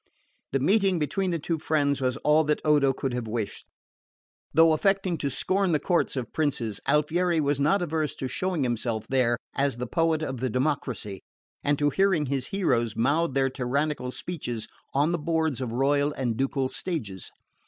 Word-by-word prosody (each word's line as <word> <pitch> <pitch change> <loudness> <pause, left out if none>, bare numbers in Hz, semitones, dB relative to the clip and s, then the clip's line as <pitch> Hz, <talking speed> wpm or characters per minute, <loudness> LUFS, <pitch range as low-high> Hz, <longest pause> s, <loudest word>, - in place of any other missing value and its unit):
The 135 - +1
meeting 195 +5 +3
between 185 +5 -1
the 170 - 0
two 165 +1 -2
friends 145 -3 +1
was 130 -1 0
all 150 +1 +5
that 150 0 +1
Odo 145 -3 +4
could 135 -1 -3
have 120 -2 -3
wished. 110 -2 -4 0.8
Though 165 +1 +6
affecting 195 +2 +1
to 140 - -1
scorn 185 +6 +1
the 150 - +3
courts 175 -2 +1
of 125 -4 -4
princes, 130 -9 -1
Alfieri 165 +3 +2
was 145 -1 +1
not 170 +7 +2
averse 155 -2 -1
to 130 - -4
showing 180 +1 -1
himself 115 -2 -1
there 125 -3 +2 0.2
as 140 -3 0
the 125 - -3
poet 160 +3 +1
of 130 -4 -3
the 130 +1 -1
democracy, 125 -6 -2 0.4
and 145 0 +2
to 145 0 +2
hearing 190 -3 +2
his 135 -1 -2
heroes 120 - 0
mouth 140 +6 +1
their 135 -1 +2
tyrannicidal 135 +1 -1
speeches 125 -9 -5 0.3
on 145 +4 +3
the 175 - -1
boards 160 -4 0
of 125 -3 -3
royal 140 +4 +2
and 125 -5 -2
ducal 135 +2 0
stages. 125 - -5
145 Hz, 175 wpm, -26 LUFS, 130-160 Hz, 0.8 s, Though